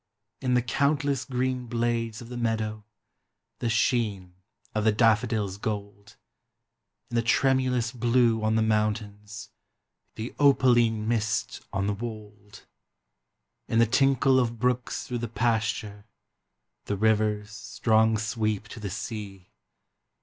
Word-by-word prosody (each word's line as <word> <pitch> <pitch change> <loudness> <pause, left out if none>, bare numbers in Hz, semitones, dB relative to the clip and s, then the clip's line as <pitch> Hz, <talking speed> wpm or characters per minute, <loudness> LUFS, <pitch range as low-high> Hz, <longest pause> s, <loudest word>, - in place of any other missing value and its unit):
In 125 -1 +1
the 125 - +2
countless 140 +1 0
green 125 -1 -2
blades 115 -1 -1
of 115 - -12
the 125 - -7
meadow. 110 -2 -2 0.8
The 120 - -1
sheen 110 -5 0 0.4
of 110 - 0
the 110 - +4
daffodil's 110 -3 +2
gold, 100 -1 -5 1.0
In - - -4
the - - +4
tremulous 125 0 +2
blue 120 -2 +2
on 110 0 +2
the 110 - +3
mountains, 105 -1 -2 0.6
The 110 +3 -6
opaline 120 -6 +4
mist 110 -2 -1
on 95 0 -1
the 105 - 0
wold. 105 -1 -9 1.0
In 115 - 0
the 115 - +6
tinkle 135 +2 +3
of 120 -2 -1
brooks 125 +1 -1
through 120 -1 -4
the 120 - -3
pasture, 110 -2 -1 0.8
The 100 - -2
river's 105 0 +1
strong 110 +1 +1
sweep 110 -1 -2
to - - -9
the 105 -2 -4
sea. 100 -2 -7
110 Hz, 125 wpm, -27 LUFS, 105-120 Hz, 1.0 s, the